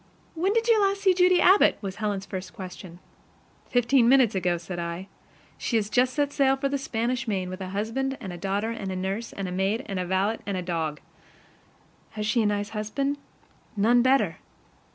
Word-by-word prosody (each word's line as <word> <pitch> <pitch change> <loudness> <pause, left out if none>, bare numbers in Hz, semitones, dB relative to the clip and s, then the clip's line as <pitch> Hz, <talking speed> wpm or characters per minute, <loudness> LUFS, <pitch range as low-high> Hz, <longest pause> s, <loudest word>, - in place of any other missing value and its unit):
"When 355 +4 0
did 455 +2 +1
you 450 -2 +5
last 395 0 +1
see 380 -2 +5
Judy 360 0 +4
Abbott?" 385 +3 +5
was 195 -3 -6
Helen's 205 -3 -2
first 190 -2 -6
question. 180 -2 -9 0.7
"Fifteen 245 0 +3
minutes 255 -4 +5
ago," 180 -2 0
said 175 +1 -6
I. 170 +3 -5 0.5
"She 235 - -2
has 215 -1 0
just 250 +3 +2
set 290 -1 0
sail 270 -1 +3
for 275 +1 -1
the 280 0 -1
Spanish 245 0 -2
main 190 -4 -2
with 185 +1 -7
a 185 - -5
husband 230 +7 -2
and 180 -6 -7
daughter 200 +3 -1
and 195 -5 -4
nurse 195 +5 -3
and 185 -2 -4
maid 200 +6 0
and 195 -3 -4
valet 195 +4 +1
and 185 -3 -2
dog." 160 -4 -2 1.2
"Has 210 - -2
she 215 +2 +2
a 215 - +2
nice 205 0 -1
husband?" 250 +7 -2 0.6
"None 235 +4 +4
better." 265 +2 +2
215 Hz, 180 wpm, -26 LUFS, 190-270 Hz, 1.2 s, you